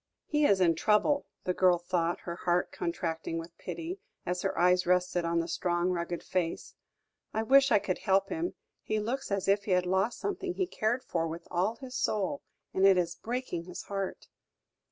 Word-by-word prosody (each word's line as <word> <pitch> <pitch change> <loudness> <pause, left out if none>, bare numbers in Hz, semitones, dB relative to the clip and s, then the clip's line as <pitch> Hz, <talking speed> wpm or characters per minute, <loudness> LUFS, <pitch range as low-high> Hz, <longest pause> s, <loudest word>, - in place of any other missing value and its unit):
"He 300 -1 +2
is 195 - +4
in 175 -3 +5
trouble," 215 - +2 0.2
the 180 - 0
girl 180 -1 +4
thought, 175 -1 -1
her 170 - -5
heart 175 0 0
contracting 165 -1 -3
with 165 +1 -7
pity, 340 +4 -5 0.3
as 180 0 -1
her 195 - -1
eyes 180 +1 +4
rested 180 -1 +2
on 170 0 +1
the 165 - -4
strong, 175 +1 0
rugged 175 -1 -3
face. 175 -3 -2 0.6
"I 220 - +1
wish 270 +3 +5
I 210 - +7
could 195 -2 -2
help 195 -1 +2
him; 335 +2 -2 0.3
he 215 - -1
looks 250 +6 -3
as 200 -1 0
if 200 +1 +3
he 195 - +1
had 180 0 +3
lost 190 +6 +1
something 385 -2 -3
he 375 - +1
cared 245 - -1
for 165 -1 -1
with 165 +1 -7
all 185 +6 +1
his 260 0 -10
soul, 240 +8 0 0.3
and 190 - +1
it 190 -1 +6
is 170 -1 +1
breaking 220 -3 -4
his 180 +1 -7
heart!" 195 -1 -4
185 Hz, 195 wpm, -30 LUFS, 175-220 Hz, 0.6 s, I